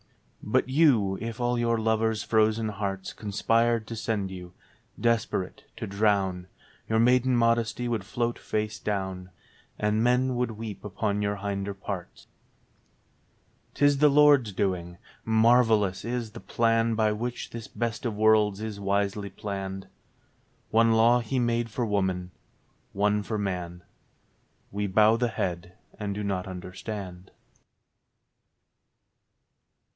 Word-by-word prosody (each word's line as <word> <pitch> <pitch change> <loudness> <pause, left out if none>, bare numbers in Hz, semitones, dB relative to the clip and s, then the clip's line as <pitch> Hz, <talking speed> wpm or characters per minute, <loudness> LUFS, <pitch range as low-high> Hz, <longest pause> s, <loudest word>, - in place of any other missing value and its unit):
But - - +1
you, 130 -10 +3
if 115 +1 -5
all 120 0 0
your 115 -1 +1
lovers' 110 0 0
frozen 110 0 +2
hearts 95 -2 -4
Conspired 115 +2 +1
to 115 - -5
send 105 -3 -2
you, 90 -1 -9 0.5
desperate, 115 -5 -1
to - - -4
drown 100 -3 0 0.2
— - - -30
Your 110 - +2
maiden 125 +2 +4
modesty 115 +1 +1
would 115 -4 -1
float 120 +4 -2
face 110 -1 -3
down, 95 -2 -3 0.5
And 105 +1 +1
men 125 +1 +2
would 125 -1 -1
weep 110 -2 -7
upon 105 0 -2
your 100 0 0
hinder 100 0 -3
parts. 95 -2 -7 1.5
'Tis 145 0 +3
the 150 0 +6
Lord's 145 -5 +5
doing. 90 -3 -2 0.3
Marvellous 110 -3 +3
is 120 -1 -3
the - - -9
plan 115 0 +1
By 110 -1 +2
which 120 +3 -4
this 115 -2 -7
best 115 -2 -3
of 115 -4 -2
worlds 105 -2 +4
is 110 -2 -5
wisely 100 0 -1
planned. 95 -1 -5 0.8
One 115 +1 +4
law 115 +2 +5
He 120 +3 -3
made 120 -1 0
for 120 +2 -2
woman, 95 -4 -1 0.6
one 105 +1 +1
for 110 +1 -3
man: 90 -3 -4 0.9
We 105 +1 -2
bow 105 +3 +5
the 120 +1 0
head 90 -4 -3 0.3
and 100 -2 -3
do 105 - -3
not 95 -2 -2
understand. 95 0 -7
110 Hz, 130 wpm, -27 LUFS, 100-115 Hz, 1.5 s, the